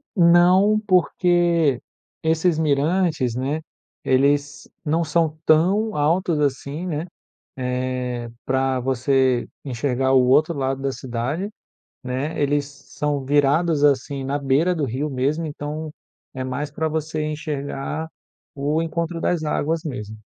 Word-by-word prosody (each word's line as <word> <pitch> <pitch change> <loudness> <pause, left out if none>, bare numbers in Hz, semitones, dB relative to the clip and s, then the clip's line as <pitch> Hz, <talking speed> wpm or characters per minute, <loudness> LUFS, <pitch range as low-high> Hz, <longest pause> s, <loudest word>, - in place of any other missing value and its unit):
Não, 180 +4 +5
porque 175 -6 +3 0.4
esses 160 +1 +1
mirantes, 150 -3 +1
né, 140 +5 -2 0.4
eles 140 +2 +1 0.2
não 160 +3 +1
são 155 0 0
tão 195 +8 +3
altos 160 +2 +1
assim, 145 +3 -2
né. 160 -2 -3 0.5
Eh, 125 -1 -2 0.2
para 130 -1 0
você 130 0 +1 0.2
enxergar 130 0 0
o 130 -1 +5
outro 155 +6 +4
lado 135 0 -1
da 140 - 0
cidade, 130 - -3 0.5
né. 135 +5 -3
Eles 145 0 +1
são 140 0 -4
virados, 145 +3 +2
assim, 140 -1 +2
na 140 +2 -1
beira 145 +6 +2
do 155 - 0
rio 135 +4 -2
mesmo, 140 +5 -1
então 150 +1 -5 0.4
é 130 -1 -5
mais 140 +3 -3
para 160 +2 -2
você 155 0 -2
enxergar 150 0 -4 0.5
o 145 +3 0
encontro 165 +1 -2
das 170 -2 0
águas 155 +1 -1
mesmo. 110 -7 -6
145 Hz, 125 wpm, -22 LUFS, 135-160 Hz, 0.5 s, Não